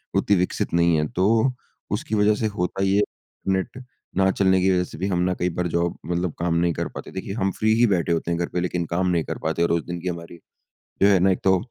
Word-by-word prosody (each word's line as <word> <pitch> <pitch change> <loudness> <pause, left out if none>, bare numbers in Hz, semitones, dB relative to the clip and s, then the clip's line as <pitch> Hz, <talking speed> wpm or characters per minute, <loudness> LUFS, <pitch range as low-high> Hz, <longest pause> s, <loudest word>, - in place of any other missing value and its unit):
उत्ती 100 - +3
विकसित 90 -2 -1
नहीं 85 -1 +4
है। 75 0 0
तो, 110 - +2 0.4
उसकी 110 - -2
वज़ह 105 0 +4
से 110 - +1
होता 90 +2 -1
ये 95 +1 +2
है, 105 - +4 0.5
नेट 95 +7 -3 0.3
ना 95 0 +4
चलने 95 -1 +3
की 95 - +3
वज़ह 90 -1 +2
से - - -9
भी 95 +4 -2
हम 90 -3 0
ना - - +1
कई 90 - +1
बार 90 0 0
जॉब 85 0 -1
मतलब 85 0 -1
काम 85 0 0
नहीं 85 0 +2
कर - - -3
पाते। - - -7
देखिए, 95 +1 -5
हम 95 -3 0
फ़्री 110 0 +3
ही 120 - +5
बैठे 90 -5 +1
होते 85 0 0
हैं 85 - -1
घर 85 - 0
पे, 90 - 0
लेकिन 90 -1 -1
काम 90 +2 +1
नहीं 85 -2 +1
कर - - -5
पाते 80 +1 0
और 85 - +1
उस 85 -1 +1
दिन 85 0 -5
की 90 - -5
हमारी, 85 -1 -5 0.6
जो 100 - +7
है 100 -2 +5
ना, 95 +2 +4
एक 95 - 0
तो 95 -1 +4
90 Hz, 265 wpm, -23 LUFS, 85-95 Hz, 0.6 s, जो